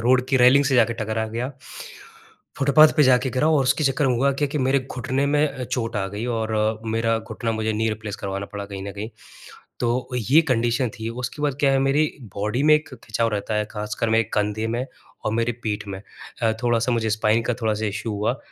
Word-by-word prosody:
Road 125 +2 +3
की 135 - +3
railing 130 +3 +6
से 135 -1 +1
जाके 115 -1 +4
टकरा 110 +1 -2
गया। 120 +5 -4 1.1
फुटपाथ 145 +3 +6
पे 150 - +6
जाके 130 0 +4
गिरा 140 +4 +1
और 150 -4 +3
उसके 150 +4 +1
चक्कर 135 +1 +2
में 125 - +2
हुआ 140 +3 +3
क्या 145 - +3
कि 150 +2 -3
मेरे 135 +1 +2
घुटने 130 +2 -1
में 150 +1 +3
अ, 130 -2 -6
चोट 115 -3 -3
आ 95 -1 -1
गई 105 +4 -5
और 110 0 0
मेरा 115 0 +1
घुटना 110 +1 -4
मुझे 110 0 -1
नी 110 +1 0
रिप्लेस 110 -1 -4
करवाना 100 0 -4
पड़ा, 100 -1 -6
कहीं 100 -1 -7
न 100 - -6
कहीं। 105 +2 -6 0.7
तो 120 +2 -1 0.2
ये 160 - +8
कंडीशन 120 +1 +1
थी। 110 +1 -3
उसके 125 +4 -5
बाद 140 -2 0
क्या 140 -1 +3
है, 135 - +3
मेरी 135 +3 +3 0.3
बॉडी 105 +6 -1
में 155 0 +6
एक 150 0 -3
खिंचाव 115 -1 -1
रहता 105 +1 -2
है, 105 0 0
खासकर 105 +1 -3
मेरे 115 0 +3
कंधे 105 +2 0
में 120 +3 -2 0.4
और 110 - 0
मेरे 115 +1 +1
पीठ 105 -2 -3
में 95 -1 -6 0.4
अ, 110 - +3
थोड़ा-सा 120 0 +1
मुझे 110 -1 0
स्पाइन 110 +1 +2
का 125 - 0
थोड़ा-सा 110 -1 0
इशू 105 +2 -3
हुआ। 105 +5 -1
115 Hz, 215 wpm, -23 LUFS, 110-130 Hz, 1.1 s, ये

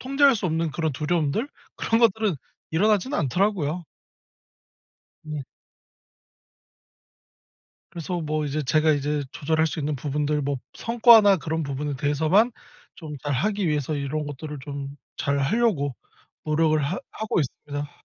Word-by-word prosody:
통제할 275 +1 +4
수 205 - -4
없는 165 -1 0
그런 160 -3 -1
두려움들? 160 - 0 0.3
그런 225 +1 +1
것들은 220 -4 +3 0.4
일어나진 210 - +2
않더라고요. 175 - 0 1.4
예. 150 -2 -4 2.5
그래서 175 +1 -4
뭐 155 -1 -1
이제 150 +1 -2
제가 155 +3 +3
이제 145 0 -1
조절할 160 +2 +1
수 160 - -4
있는 150 0 -1
부분들 150 +2 -1
뭐 140 0 -1 0.2
성과나 230 -4 +6
그런 160 0 -2
부분에 140 +1 -3
대해서만 160 - +2 0.4
좀 155 -4 -8
잘 145 - -1
하기 195 +6 0
위해서 150 0 0
이런 145 +1 -2
것들을 145 +1 -6
좀 140 -1 -6 0.2
잘 140 0 0
하려고 145 - +1 0.5
노력을 155 0 +2
하 165 +7 -2
하고 220 -4 -1
있습니다. 145 +1 -4
155 Hz, 285 characters per minute, -25 LUFS, 145-190 Hz, 2.5 s, 성과나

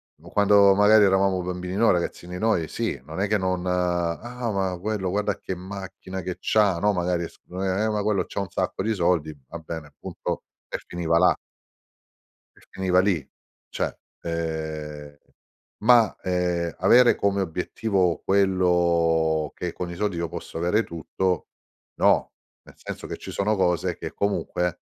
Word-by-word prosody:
mhmm, - - -18
quando 100 -1 +5
magari 105 +1 +6
eravamo 95 -1 +3
bambini 90 +1 -4
noi, 115 +3 +4
ragazzini 90 0 -3
noi, 90 -6 +1
sì, - - -3
non - - -5
è 100 - +1
che 105 +1 +2
non 95 -2 -1
"Ah, 90 +7 -1
ma 95 -2 -1
quello 100 -1 -2
guarda 105 +2 0
che 95 - -4
macchina 95 0 -7
che 90 0 -4
c'ha." 100 -5 +2
No, 105 +3 +3
magari 90 -2 0
s - - -21
uhm: 90 +1 -6
"Eh, 95 +3 +1
ma 105 -1 -1
quello 105 -1 +1
c'ha 100 - -3
un 100 - -5
sacco - - -2
di 110 - +1
soldi." 85 -5 +1
Va 85 - -7
bene, 80 -3 -8
punto - - -5 0.2
e - - -3
finiva 85 -1 0
là 90 +2 +5 1.2
e - - -21
finiva 90 -1 +1
lì 95 -7 0 0.4
cioè, - - -3 0.2
ehm, 80 -3 -4 0.7
ma, 115 -2 +5
ehm, 90 -2 -1
avere 125 0 +6
come 100 0 +1
obiettivo, 90 0 0
quello 85 -5 +2
che 90 - -3
con 90 - -5
i 85 - -6
soldi 100 -1 -1
io 85 0 -1
posso 80 - -7
avere 90 +7 +2
tutto, 90 +1 -2 0.5
no. - - +3 0.3
Nel - - -17
senso - - -7
che - - -5
ci - - -8
sono 105 +2 +1
cose 90 -4 +1
che - - -6
comunque 90 -3 -1
90 Hz, 160 wpm, -25 LUFS, 85-100 Hz, 1.2 s, magari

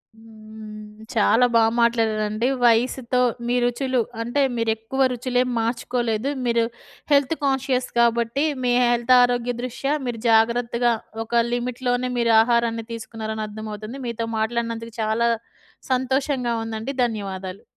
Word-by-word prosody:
హ్మ్. 215 -1 -12
చాలా 230 +3 +4
బా 230 - +6 0.2
మాట్లాడారండి. 225 -1 +1 0.2
వయసుతో 240 +2 +2 0.3
మీ 245 - +1
రుచులు 250 +1 0 0.2
అంటే, 240 +5 0 0.2
మీరేక్కువ 225 +3 -1
రుచులేం 250 +1 0
మార్చుకోలేదు. 235 +1 -1 0.2
మీరు 235 -1 +2 0.5
హెల్త్ 280 +2 +3
కాన్షియస్ 265 -2 0
కాబట్టి, 235 +3 +2 0.2
మీ 245 - +2 0.2
హెల్త్ 240 +1 +3
ఆరోగ్య 245 0 +1
దృష్ట్యా 255 +3 -2
మీరు 230 -2 -4
జాగ్రత్తగా, 235 +1 +3 0.3
ఒక 230 - -12 0.2
లిమిట్‌లోనే 245 +1 -1
మీరు 235 -1 +2
ఆహారాన్ని 230 -1 +1
తీసుకున్నారని 220 -1 -5
అర్థమవుతుంది. 215 +4 -7
మీతో 230 -1 -3
మాట్లాడినందుకు 230 0 -2
చాలా 220 +2 +1 0.6
సంతోషంగా 260 -1 0
ఉందండి. 225 +3 -4
ధన్యవాదాలు. 195 -4 -5
235 Hz, 110 wpm, -23 LUFS, 220-245 Hz, 0.6 s, బా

